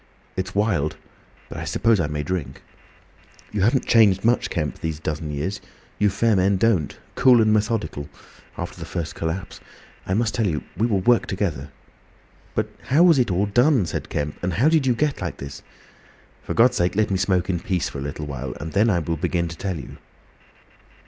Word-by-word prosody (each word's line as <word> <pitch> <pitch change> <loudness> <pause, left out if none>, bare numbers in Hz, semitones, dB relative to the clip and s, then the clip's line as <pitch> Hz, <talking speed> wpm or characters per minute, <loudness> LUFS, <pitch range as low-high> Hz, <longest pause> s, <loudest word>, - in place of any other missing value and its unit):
"It's 95 +1 -4
wild—but 100 -8 -3
I - - -4
suppose 115 -3 +2
I 85 - +1
may 75 -1 -3
drink." 90 -1 -4 0.9
"You 105 - -1
haven't 120 +7 +2
changed 105 -4 +4
much, 120 0 +2
Kemp, 75 -5 -3
these 80 -2 -3
dozen 75 0 -4
years. 95 +8 -3 0.4
You 105 - +4
fair 110 +3 +2
men 95 +1 +3
don't. 95 -8 +1 0.2
Cool 125 -3 +5
and 110 -1 +4
methodical—after 105 -9 -4
the - - -7
first 80 -3 -4
collapse. 85 +4 -4 0.5
I 95 - 0
must 115 +1 +1
tell 115 -4 +1
you. 75 -4 -2
We 110 +6 +1
will 100 -5 +1
work 120 +5 +3
together!" 85 -7 -2 0.9
"But - - 0 0.2
how 150 +6 +5
was 170 -6 +6
it 120 - +2
all 95 +2 +1
done?" 120 - +3
said 80 - -4
Kemp, 75 0 -3
"and 90 0 -1
how 130 - +3
did 160 -4 +2
you 125 - +3
get 150 +3 0
like - - -4
this?" 70 0 -8 0.8
"For - - -5
God's 125 +2 +4
sake, 90 +2 +1
let 105 -1 +1
me 95 - +2
smoke 95 -1 +1
in 90 -3 0
peace 90 0 -1
for 70 - -6
a - - -5
little 75 +2 -5
while! 65 -3 -5
And 80 +2 -6
then 105 +3 +3
I 95 - +3
will 85 0 -2
begin 85 +2 0
to 85 - -7
tell 95 +1 -3
you." 65 - -9
95 Hz, 195 wpm, -23 LUFS, 80-115 Hz, 0.9 s, was